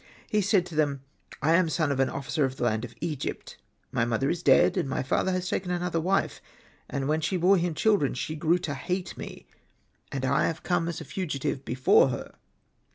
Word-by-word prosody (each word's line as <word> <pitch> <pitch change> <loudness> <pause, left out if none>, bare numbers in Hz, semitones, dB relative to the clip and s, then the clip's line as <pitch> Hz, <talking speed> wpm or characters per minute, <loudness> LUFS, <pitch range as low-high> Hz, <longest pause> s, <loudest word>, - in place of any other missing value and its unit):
'' - - -27
He 210 - +4
said 195 -2 +3
to 175 - -10
them, 145 -3 +1 0.2
'' - - -17
I 160 +2 +4
am 170 -1 +4
son 155 -2 0
of" 135 - -1
an 135 - +3
officer 140 +2 -2
of 130 -1 -1
the - - -4
land 110 -1 +1
of 120 -1 -8
Egypt; 155 -5 -4 0.3
my - - +1
mother 120 +4 0
is 175 - -3
dead, - - +5
and 175 -8 -1
my 130 - -1
father 160 +7 +1
has 185 0 -1
taken 180 0 -2
another 175 -1 -1
wife. 190 +4 0 0.5
And 135 -1 -2
when 155 +2 +1
she 185 +4 0
bore 185 +2 +4
children, 175 -2 +1
she 155 +4 -3
grew 160 +3 +2
to 145 - -3
hate 180 +7 -3
me, - - -9 0.7
and 135 -1 -2
I 140 +2 +2
have 165 -1 -4
come 175 -2 0
as 170 - -4
a - - -8
fugitive 145 -3 -2
from 135 - -19
before 130 +2 +4
her." 125 - -5
155 Hz, 220 wpm, -27 LUFS, 135-180 Hz, 0.7 s, dead